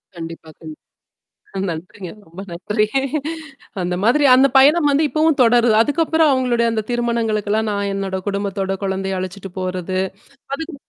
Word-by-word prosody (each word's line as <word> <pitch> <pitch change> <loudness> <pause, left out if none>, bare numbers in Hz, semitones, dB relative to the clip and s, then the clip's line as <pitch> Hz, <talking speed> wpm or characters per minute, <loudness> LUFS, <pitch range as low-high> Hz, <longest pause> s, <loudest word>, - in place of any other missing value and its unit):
கண்டிப்பா 165 -1 -8
கண்டி 155 -2 -10 0.8
அ - - -2
நன்றிங்க. 175 +3 -7 0.2
ரொம்ப 170 +4 -11
நன்றி. 210 +5 -1 1.0
அந்த 180 0 -2
மாதிரி 285 +6 +3
அந்த 265 +2 +6
பயணம் 295 +3 +5
வந்து 285 +3 +2
இப்பவும் 310 0 +1
தொடருது. 240 -1 +4
அதுக்கப்புறம் 320 +3 +2
அவுங்களுடைய 245 -3 +1
அந்த 220 -1 -1
திருமணங்களுக்கெல்லாம் 220 -3 0
நான் 200 0 -2
என்னோட 195 -1 -3
குடும்பத்தோட 200 -1 -2
கொழந்தைய 190 0 -2
அழச்சுட்டு 190 +1 -7
போறது. 185 0 -3 0.6
அதுக்கு 320 +2 -7
210 Hz, 130 wpm, -19 LUFS, 190-255 Hz, 1.0 s, அந்த